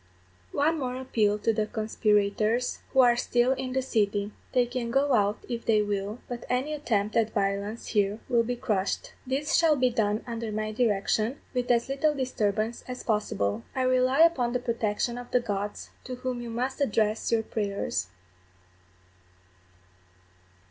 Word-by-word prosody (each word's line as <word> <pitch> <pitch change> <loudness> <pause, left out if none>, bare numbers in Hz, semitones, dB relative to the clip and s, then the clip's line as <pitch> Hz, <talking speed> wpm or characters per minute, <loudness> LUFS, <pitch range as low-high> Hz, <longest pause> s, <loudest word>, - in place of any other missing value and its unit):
_One 315 +3 +1
more 250 -2 -2
appeal 220 -5 +1
to 225 +2 +1
the 215 -1 0
conspirators 215 +1 +1
who 265 - +5
are 240 -1 +5
still 245 +1 +2
in 260 -1 -2
the 265 0 0
city. 205 -4 0 0.2
They 250 -2 +3
can 240 -1 -3
go 275 +3 +2
out 205 -2 +3
if 235 -1 -4
they 215 -2 +3
will, 205 +1 -2
but 240 -2 -6
any 260 +5 0
attempt 220 -8 -1
at 225 -1 +1
violence 200 +2 -1
here 205 -1 +1
will 235 -2 +3
be 245 +2 -2
crushed. 210 -5 -2
This 275 +3 -1
shall 325 -2 +5
be 255 -2 +2
done 215 -1 0
under 230 -2 -4
my 215 0 -2
direction, 215 +2 +1
with 250 -1 -1
as 235 0 +3
little 285 +3 +1
disturbance 225 -4 -1
as 250 0 -6
possible. 110 - 0
I 260 - +1
rely 255 +3 +3
upon 265 -8 +4
the 250 - +1
protection 235 0 -1
of 245 - -9
the 250 - +3
gods, 205 -3 -4
to 255 - -5
whom 250 -1 -4
you 240 - -6
must 250 +5 -3
address 220 -4 +1
your 225 -1 +2
prayers. 200 - -2
235 Hz, 160 wpm, -27 LUFS, 210-255 Hz, 0.2 s, who